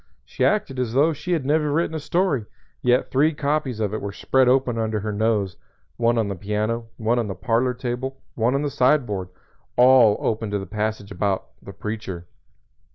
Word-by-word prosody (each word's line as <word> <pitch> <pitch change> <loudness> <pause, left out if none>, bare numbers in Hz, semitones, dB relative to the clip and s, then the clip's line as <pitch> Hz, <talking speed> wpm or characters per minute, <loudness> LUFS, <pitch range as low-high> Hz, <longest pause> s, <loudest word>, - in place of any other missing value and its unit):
She - - -3
acted 140 -11 +1
as 120 -3 -1
though 150 +5 +4
she 155 +5 -3
had 155 -6 -1
never 150 +1 +2
written 160 +2 0
a 160 - -2
story, 150 - 0 0.3
yet 125 +1 +2
three 150 +4 +3
copies 145 -5 -1
of 105 -2 -1
it 110 - -3
were 100 - -4
spread 130 +5 +2
open 125 -2 +2
under 110 -2 -1
her 105 +1 -3
nose 105 -3 0 0.4
one 120 0 +2
on 110 -2 +1
the 100 - -2
piano, 105 +4 -2
one 115 +2 +1
on 115 - -1
the 95 - -4
parlor 120 +7 0
table, 130 +2 -4
one 120 +3 +1
on 140 - 0
the 145 - -1
sideboard 125 -10 +1 0.5
all 125 -4 +6
open 110 -1 -2
at - - 0
the 95 - -6
passage 105 +1 -3
about 95 0 -1
"The - - -10
Preacher." 105 -5 -5
120 Hz, 195 wpm, -23 LUFS, 105-135 Hz, 0.5 s, all